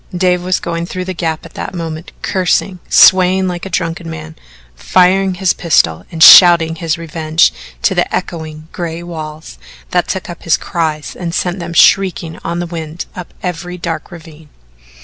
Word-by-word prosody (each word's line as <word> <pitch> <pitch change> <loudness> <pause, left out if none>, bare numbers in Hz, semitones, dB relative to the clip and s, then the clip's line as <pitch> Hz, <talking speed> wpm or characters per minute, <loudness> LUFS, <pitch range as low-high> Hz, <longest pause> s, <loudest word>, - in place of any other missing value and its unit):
Dave 180 -1 +1
was 185 0 0
going 170 0 -4
through 185 0 -5
the 185 - -4
Gap 160 -2 -3
at - - -13
that - - -6
moment, 165 -1 -6
cursing, 185 0 0
swaying 185 0 +5
like 180 +1 -4
a - - -9
drunken 165 -1 -3
man, 160 0 -8 0.4
firing 185 - +2
his 180 -1 +1
pistol 85 - +1
and 160 -1 +2
shouting 170 -3 +8
his 165 -1 -2
revenge 160 -1 +1 0.3
to - - +2
the - - 0
echoing 155 -2 -5
gray 170 -1 -5
walls 155 -2 -8 0.3
that 180 -1 +1
took 190 - -4
up 175 - -9
his 165 - +2
cries 155 -3 -3
and 170 -1 -5
sent 180 +1 -2
them 170 -1 -6
shrieking 175 -3 +3
on 170 +1 -3
the 175 - -2
wind 165 -1 -6
up 180 -2 -8
every 180 0 -5
dark 170 -2 -5
ravine. 160 -3 -14
170 Hz, 170 wpm, -14 LUFS, 160-180 Hz, 0.4 s, shouting